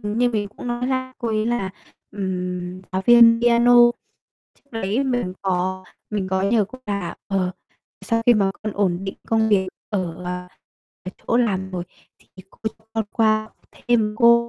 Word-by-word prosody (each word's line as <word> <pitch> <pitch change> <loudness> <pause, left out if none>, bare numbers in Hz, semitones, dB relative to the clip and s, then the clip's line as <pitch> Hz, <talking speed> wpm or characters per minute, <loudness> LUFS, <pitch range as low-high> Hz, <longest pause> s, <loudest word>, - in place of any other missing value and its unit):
như 220 +4 +1
mình 210 -3 -1
cũng 210 - -10
nói 240 +1 -2
là, 260 0 -2
cô 235 - -2
ấy 215 0 0
là, 235 -5 -1 0.4
ừm, 180 -2 -4
giáo 190 0 -1
viên 235 -1 +7
piano, 240 0 +5 0.8
trước 280 - -34
đấy 225 +3 -1
mình 245 -8 -1
có 185 0 -1 0.3
mình 200 -3 -2
có 190 0 +1
nhờ 210 +2 +3
cô 255 - -11
là, 200 -4 -3
ờ: 190 -2 0 0.5
"Sau 230 -1 0
khi 240 - +7
mà 200 -3 +2
con 215 -1 -3
ổn 190 -4 +1
định 195 - -4
công 220 -1 +2
việc 190 -3 +2 0.2
ở, 180 -4 -3
à, 180 0 -5 0.6
ở 185 - -5 0.2
chỗ 235 - +2
làm 190 -6 0
rồi, 180 -2 -4 0.3
thì - - -28 0.2
cô - - -23 0.2
cho 220 - -30
con 225 -1 -1
qua 215 -1 +3
học 215 - -20 0.2
thêm 225 -3 0
cô", 235 0 +5
210 Hz, 180 wpm, -22 LUFS, 190-235 Hz, 0.8 s, viên